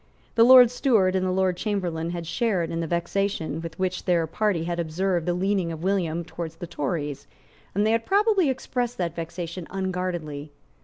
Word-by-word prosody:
The 230 - +5
Lord 250 -1 +9
Steward 220 -8 +2
and 185 - +1
the 185 - 0
Lord 185 -1 +1
Chamberlain 175 -6 -2
had 170 -1 -4
shared 180 -1 0
in 165 - -2
the 165 - -2
vexation 170 -2 -1
with 165 -1 -7
which 185 -1 -2
their 175 -3 +2
party 180 +1 0
had 170 0 -3
observed 170 +1 -1
the 175 - +1
leaning 190 -2 0
of 160 0 -7
William 175 -4 0
towards 165 -1 -6
the 175 - -7
Tories; 145 -3 -3 0.5
and 205 +2 +2
they 220 - +3
had 230 0 +1
probably 400 -5 +3
expressed 245 -2 -2
that 170 -2 -2
vexation 170 +1 -5
unguardedly. 180 -6 -3
180 Hz, 185 wpm, -25 LUFS, 165-200 Hz, 0.5 s, Lord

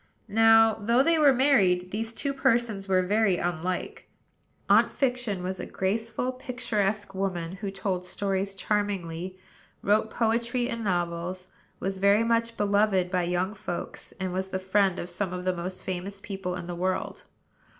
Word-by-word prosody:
Now, 225 0 +5
though 235 +5 +3
they 330 +1 +3
were 290 -2 +7
married, 200 -10 +3
these 225 +2 -2
two 275 +4 -3
persons 230 -6 +1
were 185 -1 +3
very 200 -1 +2
unlike. 175 +1 -3 0.6
Aunt - - +5
Fiction 245 -8 -1
was 185 +1 -3
a - - -4
graceful, 225 +6 -1
picturesque 220 -6 -2
woman; 185 -2 -3
who 200 0 -4
told 195 -2 -2
stories 195 +1 -2
charmingly, 190 -4 -2 0.5
wrote 215 +2 +2
poetry 235 +2 0
and 230 -1 -3
novels, 180 -1 -2 0.3
was 195 0 -2
very 200 +3 +4
much 230 0 +1
beloved 200 -3 +2
by 180 -2 +2
young 180 +3 -1
folks, 195 -4 -5
and 185 -1 -2
was 190 +1 -2
the 190 - -3
friend 190 0 +2
of 175 - -4
some 185 0 -3
of 180 0 -5
the 185 - +2
most 180 +2 -5
famous 190 +2 -4
people 195 -2 -4
in 180 - -6
the 175 - -5
world. 185 +2 -2
195 Hz, 160 wpm, -27 LUFS, 185-225 Hz, 0.6 s, were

